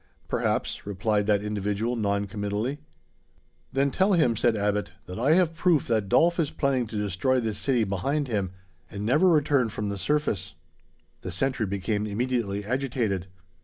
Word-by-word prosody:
"Perhaps," -, -, -1 dB
replied 105 Hz, +1 st, 0 dB
that 105 Hz, -1 st, +2 dB
individual 105 Hz, +3 st, -1 dB
non 100 Hz, -2 st, 0 dB
committally. 105 Hz, +7 st, -3 dB, 0.9 s
"Then 135 Hz, +1 st, +1 dB
tell 195 Hz, +6 st, +2 dB
him," 155 Hz, -10 st, +3 dB
said 115 Hz, +1 st, +2 dB
Abbot, 105 Hz, -2 st, -1 dB
"that 90 Hz, +4 st, -7 dB
I 140 Hz, +7 st, +4 dB
have 175 Hz, -3 st, +3 dB
proof 170 Hz, -3 st, +2 dB
that 110 Hz, -4 st, +1 dB
Dolf 170 Hz, -, +4 dB
is 155 Hz, -4 st, +2 dB
planning 130 Hz, -4 st, 0 dB
to 110 Hz, -, -8 dB
destroy 105 Hz, +6 st, +1 dB
this 110 Hz, -3 st, -2 dB
city 125 Hz, -1 st, +2 dB
behind 135 Hz, +10 st, -1 dB
him, 100 Hz, -6 st, -1 dB, 0.4 s
and 100 Hz, +1 st, -5 dB
never 150 Hz, +11 st, +4 dB
return 145 Hz, -6 st, +3 dB
from 105 Hz, -1 st, -3 dB
the 100 Hz, -1 st, -4 dB
surface." 110 Hz, -, -1 dB, 0.7 s
The -, -, -5 dB
sentry 125 Hz, +4 st, -1 dB
became 105 Hz, +2 st, -1 dB
immediately 105 Hz, -2 st, -1 dB
agitated. 115 Hz, -6 st, -1 dB
110 Hz, 160 wpm, -26 LUFS, 100-135 Hz, 0.9 s, I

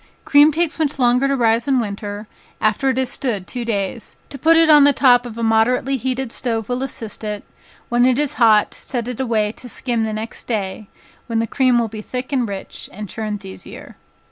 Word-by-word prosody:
Cream 290 Hz, +2 st, +6 dB
takes 330 Hz, +1 st, -1 dB
much 300 Hz, -3 st, 0 dB
longer 250 Hz, +1 st, +3 dB
to 275 Hz, -, +1 dB
rise 230 Hz, -1 st, +2 dB
in 265 Hz, -2 st, +3 dB
winter, 205 Hz, -1 st, -5 dB, 0.3 s
after 215 Hz, +5 st, +1 dB
it 260 Hz, -, 0 dB
has 260 Hz, -1 st, 0 dB
stood 215 Hz, -8 st, -3 dB
two 245 Hz, +3 st, -5 dB
days, 210 Hz, -1 st, -3 dB
to 275 Hz, -, -8 dB
put 325 Hz, +4 st, +5 dB
it 330 Hz, 0 st, +5 dB
on 300 Hz, -2 st, +7 dB
the 285 Hz, 0 st, +5 dB
top 245 Hz, -2 st, +4 dB
of 230 Hz, -1 st, -9 dB
a 230 Hz, -, -3 dB
moderately 235 Hz, +4 st, +2 dB
heated 260 Hz, -1 st, -3 dB
stove 225 Hz, -4 st, -2 dB
will 250 Hz, +1 st, -2 dB
assist 225 Hz, -5 st, -5 dB
it, 210 Hz, -1 st, -4 dB, 0.4 s
when 240 Hz, 0 st, +2 dB
it 255 Hz, -1 st, +2 dB
is 295 Hz, -1 st, 0 dB
hot, 215 Hz, -2 st, +5 dB
set 240 Hz, -3 st, -4 dB
it 250 Hz, -1 st, -5 dB
away 220 Hz, -5 st, 0 dB
to 245 Hz, +2 st, -10 dB
skim 235 Hz, -1 st, -1 dB
the 220 Hz, -, -2 dB
next 215 Hz, +1 st, -6 dB
day, 205 Hz, -2 st, -3 dB, 0.4 s
when 230 Hz, -2 st, -2 dB
the 225 Hz, -, +1 dB
cream 255 Hz, +1 st, +2 dB
will 235 Hz, -1 st, +1 dB
be 215 Hz, 0 st, -8 dB
thick 255 Hz, +5 st, -5 dB
and 245 Hz, -5 st, 0 dB
rich, 195 Hz, -1 st, -7 dB
and 210 Hz, 0 st, -8 dB
churns 210 Hz, -2 st, -5 dB
easier. 190 Hz, -, -10 dB
240 Hz, 215 wpm, -19 LUFS, 215-265 Hz, 0.4 s, on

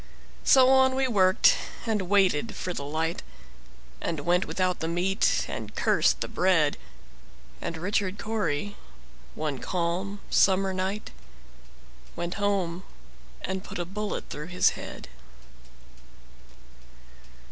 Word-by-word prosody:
So 260 Hz, -1 st, +6 dB
on 265 Hz, 0 st, +5 dB
we 265 Hz, 0 st, +1 dB
worked, 190 Hz, -5 st, +4 dB, 0.3 s
and 220 Hz, -3 st, 0 dB
waited 200 Hz, 0 st, +2 dB
for 180 Hz, -, -4 dB
the 140 Hz, -, -5 dB
light, 160 Hz, +3 st, -2 dB, 0.8 s
And 160 Hz, -3 st, -2 dB
went 175 Hz, +5 st, +2 dB
without 185 Hz, -2 st, 0 dB
the 160 Hz, -, -2 dB
meat, 180 Hz, +4 st, +1 dB
and -, -, -6 dB
cursed -, -, +2 dB
the -, -, -1 dB
bread; 165 Hz, -5 st, +2 dB, 0.9 s
And 165 Hz, -, -4 dB
Richard 195 Hz, +2 st, -1 dB
Cory, 205 Hz, -4 st, -2 dB, 0.6 s
one 150 Hz, -4 st, -3 dB
calm 185 Hz, +5 st, -2 dB
summer 190 Hz, 0 st, +3 dB
night, 190 Hz, +3 st, -3 dB, 1.0 s
Went 175 Hz, +1 st, -3 dB
home 190 Hz, -4 st, 0 dB, 0.6 s
and 190 Hz, +1 st, -3 dB
put -, -, -7 dB
a 175 Hz, -, -2 dB
bullet 210 Hz, +4 st, -4 dB
through 150 Hz, +2 st, -6 dB
his 180 Hz, 0 st, +3 dB
head. -, -, -8 dB
185 Hz, 115 wpm, -27 LUFS, 170-205 Hz, 1.0 s, So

